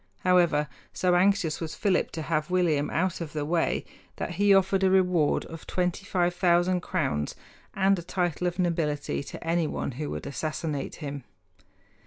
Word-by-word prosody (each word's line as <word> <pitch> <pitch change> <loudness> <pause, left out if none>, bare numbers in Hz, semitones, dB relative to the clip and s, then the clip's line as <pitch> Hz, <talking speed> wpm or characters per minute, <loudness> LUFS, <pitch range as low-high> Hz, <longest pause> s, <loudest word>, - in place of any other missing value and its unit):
However, 170 -5 +3 0.3
so 180 -1 +1
anxious 180 -3 +2
was 160 -2 -4
Philip 195 -3 +1
to 160 - -4
have 155 0 -1
William 165 -5 +2
out 180 +1 -1
of 155 -3 -5
the 150 -2 -2
way 165 +2 0 0.3
that - - -4
he 200 +4 +3
offered 195 0 +4
a 190 - +5
reward 180 -5 +2
of 165 0 -10
25,000 180 -1 +1
crowns 130 - -1 0.4
and 195 -1 +3
a - - -4
title 175 0 -1
of 175 - -3
nobility 165 -6 -1
to 140 - -9
anyone 165 -4 0
who 145 +4 -5
would - - -5
assassinate 150 0 -3
him. 140 -3 -6
175 Hz, 155 wpm, -27 LUFS, 155-185 Hz, 0.4 s, a